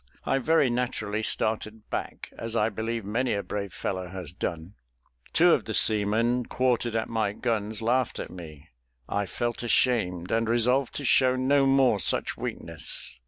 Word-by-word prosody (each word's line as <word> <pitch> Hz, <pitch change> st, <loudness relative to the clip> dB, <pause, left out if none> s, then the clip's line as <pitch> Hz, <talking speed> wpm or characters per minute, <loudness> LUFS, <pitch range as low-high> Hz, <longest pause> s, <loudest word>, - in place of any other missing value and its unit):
I 135 Hz, -, +1 dB
very 145 Hz, -2 st, +3 dB
naturally 110 Hz, -3 st, -2 dB
started 110 Hz, 0 st, -1 dB
back, -, -, -5 dB
as 115 Hz, 0 st, -5 dB
I 110 Hz, -1 st, +2 dB
believe 115 Hz, +1 st, -3 dB
many 115 Hz, +3 st, 0 dB
a 100 Hz, -, -2 dB
brave 100 Hz, -2 st, -4 dB
fellow 95 Hz, 0 st, -3 dB
has 90 Hz, -3 st, -8 dB
done. 85 Hz, 0 st, -4 dB, 0.6 s
Two -, -, +5 dB
of -, -, +1 dB
the -, -, -3 dB
seamen 110 Hz, +3 st, +2 dB
quartered 120 Hz, -2 st, 0 dB
at 110 Hz, -, 0 dB
my 110 Hz, -3 st, -1 dB
guns 110 Hz, -2 st, -2 dB
laughed 125 Hz, +1 st, +1 dB
at -, -, -6 dB
me. 80 Hz, -3 st, -11 dB, 0.4 s
I 100 Hz, -1 st, -1 dB
felt 120 Hz, +4 st, -3 dB
ashamed, 110 Hz, -8 st, +1 dB
and 115 Hz, 0 st, +1 dB
resolved 125 Hz, +3 st, +2 dB
to 145 Hz, -, -4 dB
show 130 Hz, 0 st, +4 dB
no 135 Hz, +2 st, +3 dB
more 135 Hz, -6 st, +4 dB
such 85 Hz, -, 0 dB
weakness. -, -, -3 dB
110 Hz, 165 wpm, -27 LUFS, 100-125 Hz, 0.6 s, Two